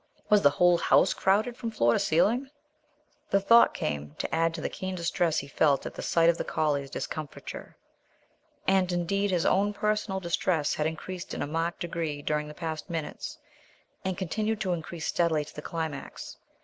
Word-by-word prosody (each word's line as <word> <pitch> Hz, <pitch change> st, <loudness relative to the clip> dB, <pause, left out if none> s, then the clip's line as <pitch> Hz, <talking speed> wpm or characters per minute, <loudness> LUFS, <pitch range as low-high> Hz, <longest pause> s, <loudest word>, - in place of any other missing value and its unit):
Was 210 Hz, -1 st, +6 dB
the 145 Hz, -, +7 dB
whole 175 Hz, +3 st, +4 dB
house -, -, +4 dB
crowded 215 Hz, +5 st, +1 dB
from 230 Hz, -1 st, -4 dB
floor 120 Hz, -, +2 dB
to -, -, +2 dB
ceiling? 235 Hz, -, +2 dB, 0.8 s
The 195 Hz, -, +4 dB
thought 230 Hz, +4 st, +6 dB
came 75 Hz, 0 st, -3 dB
to -, -, -3 dB
add 165 Hz, 0 st, +2 dB
to -, -, -5 dB
the -, -, -1 dB
keen 185 Hz, 0 st, -5 dB
distress 170 Hz, -1 st, 0 dB
he 140 Hz, -, -2 dB
felt 140 Hz, 0 st, +2 dB
at -, -, -5 dB
the -, -, -7 dB
sight 165 Hz, -1 st, +3 dB
of 170 Hz, 0 st, +3 dB
the -, -, 0 dB
collie's 145 Hz, -3 st, 0 dB
discomfiture. 155 Hz, +1 st, -6 dB, 0.9 s
And, 190 Hz, -1 st, +3 dB
indeed, 195 Hz, +4 st, 0 dB
his 180 Hz, -3 st, +1 dB
own 205 Hz, +2 st, +3 dB
personal 210 Hz, -2 st, 0 dB
distress 170 Hz, -3 st, 0 dB
had 150 Hz, -, 0 dB
increased 175 Hz, +3 st, -6 dB
in -, -, -2 dB
a -, -, -3 dB
marked 165 Hz, +3 st, -2 dB
degree 165 Hz, -4 st, -3 dB
during 150 Hz, 0 st, -1 dB
the 150 Hz, -, -9 dB
past 160 Hz, -2 st, -5 dB
minutes, 165 Hz, -3 st, -5 dB, 0.7 s
and 190 Hz, -1 st, -2 dB
continued 210 Hz, +4 st, -1 dB
to 185 Hz, -2 st, 0 dB
increase 165 Hz, 0 st, -5 dB
steadily 160 Hz, -3 st, +1 dB
to -, -, -13 dB
the 150 Hz, -, -7 dB
climax. 160 Hz, -3 st, -5 dB
170 Hz, 185 wpm, -28 LUFS, 155-190 Hz, 0.9 s, the